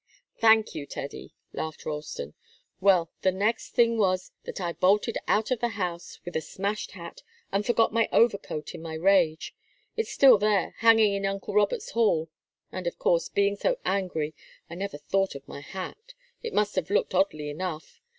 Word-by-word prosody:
"Thank 220 -1 +5
you, 145 -2 -6
Teddy," 140 0 -7 0.2
laughed 160 -1 -5
Ralston. 150 - -5 0.5
"Well, 185 -4 +3
the 185 - +3
next 210 +5 -1
thing 230 -1 +4
was 185 -2 +1
that - - -6
I 175 -2 -2
bolted 205 +6 +2
out 215 +4 +1
of 250 - +1
the 240 - +1
house 175 -3 -4
with 175 - -7
a 160 - +1
smashed 200 +5 -4
hat, 170 -2 -10 0.3
and 200 +1 +1
forgot 230 -1 +2
my 230 0 +2
overcoat 200 -9 +1
in - - -8
my 160 -1 -6
rage. 170 -2 +2 0.4
It's 450 - -3
there 275 - +8
still, 205 -3 +2
hanging 225 -2 +5
in 195 0 -1
uncle 195 0 -4
Robert's 205 -1 +1
hall. 165 -9 +1 0.4
And, 185 -2 -4
of 170 - -3
course, 170 -1 +1
being 200 0 +1
so - - 0
angry, 170 -6 -1 0.3
I - - -10
never 190 -2 -4
thought 195 +5 -1
of 140 - -10
my - - -8
hat. 310 - -8 0.3
It 465 -1 -5
must 210 0 +2
have 185 - 0
looked 205 - +1
oddly 155 -6 +1
enough. 160 0 -6
195 Hz, 180 wpm, -27 LUFS, 165-210 Hz, 0.5 s, there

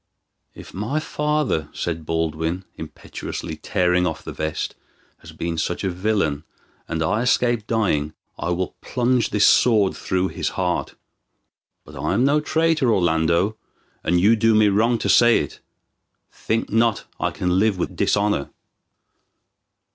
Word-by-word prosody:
"If - - -12
my 110 +11 -2
father," 150 - -1
said 80 -2 -4
Baldwin, 80 +2 -2
impetuously 80 - -7
tearing 90 0 +1
off 80 - -5
the - - -6
vest, 80 0 -3 0.5
"has - - -12
been 85 -1 -4
such 90 - -2
a 95 - 0
villain, 90 -6 -1 0.4
and 80 -1 -2
I 105 +8 0
escape 120 -3 +1
dying, 80 -10 0 0.2
I - - -4
will 90 +1 -2
plunge 125 -2 0
this 105 -1 +3
sword 105 -6 +4
through 95 0 -1
his - - -2
heart. - - -1 0.9
But 75 - -13
I 75 +6 -1
am 120 - +2
no 145 +2 +3
traitor, 160 -4 +1
Orlando, 85 +2 +1 0.5
and 90 +2 +2
you 105 +6 +5
do 115 0 +3
me 105 -1 +5
wrong 115 +4 +2
to - - -3
say 120 -1 +6
it. - - -4 0.7
Think 115 +1 -2
not 115 0 +2
I - - 0
can 90 +1 0
live 105 -1 +2
with 90 - -3
dishonor." 100 -9 +1
100 Hz, 145 wpm, -22 LUFS, 85-115 Hz, 0.9 s, say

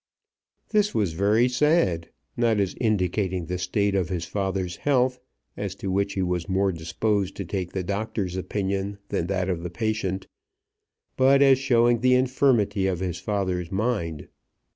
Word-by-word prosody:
This 210 -1 +1
was 100 -7 +1
very 105 +7 +3
sad, 125 - +2 0.3
not 115 -3 +2
as 95 -2 0
indicating 95 -4 0
the 90 +2 -3
state 100 +2 0
of 95 -3 0
his 85 -2 -2
father's 95 -3 -2
health, 130 -3 +1 0.4
as - - -4
to 95 - -4
which 100 +1 0
he 95 - -1
was 90 -1 -2
more 95 +1 +2
disposed 95 +4 -1
to 100 - -5
take 90 0 -4
the 95 - -2
doctor's 100 -1 -3
opinion 100 +1 -2
than 85 - -1
that 95 -1 -1
of 90 -3 -1
the 90 - -4
patient, 95 -1 -2 0.9
but 135 +1 +5
as 135 -2 +5
showing 120 -3 +3
the 125 +2 +4
infirmity 125 -6 +2
of 90 -3 -1
his 90 -2 -3
father's 95 -3 -2
mind. 95 -7 -2
100 Hz, 160 wpm, -25 LUFS, 90-115 Hz, 0.9 s, but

